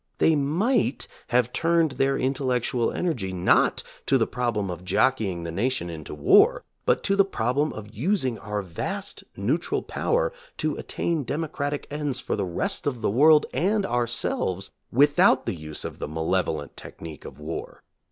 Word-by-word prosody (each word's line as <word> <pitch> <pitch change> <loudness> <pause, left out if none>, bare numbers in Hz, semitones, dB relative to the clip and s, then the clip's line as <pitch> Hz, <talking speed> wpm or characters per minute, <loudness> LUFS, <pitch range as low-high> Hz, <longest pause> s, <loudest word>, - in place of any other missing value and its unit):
They 160 - +4
might 165 - +1 0.2
have 125 0 +2
turned 165 -2 +2
their 135 +1 +1
in 130 +1 +1
tellectual 125 -3 0
energy 125 - -2
not 90 0 +3 0.2
to 135 - +4
the 115 - +2
problem 110 -6 -1
of 90 0 -7
jockeying 100 -4 +1
the 85 - -4
nation 100 -2 -1
into 80 -2 -7
war, 75 - +5 0.2
but - - +3
to 195 - +2
the 200 - +6
problem 145 -4 0
of 110 0 -9
using 130 - 0
our 105 -2 -3
vast 195 - -4
neutral - - 0
power - - 0 0.2
to - - -1
attain 165 -4 -2
democratic 145 +1 -3
ends 145 -3 -2
for - - -2
the - - -1
rest 170 - 0
of 125 -5 -2
the - - +2
world 150 +6 +6
and 195 +9 +1
ourselves 120 - -1 0.2
without 140 0 +4
the - - -1
use 75 -3 -6
of - - -6
the - - -3
malevolent 80 -1 -1
technique 80 -3 -9
of - - -10
war. 80 +2 -6
125 Hz, 160 wpm, -25 LUFS, 95-150 Hz, 0.2 s, the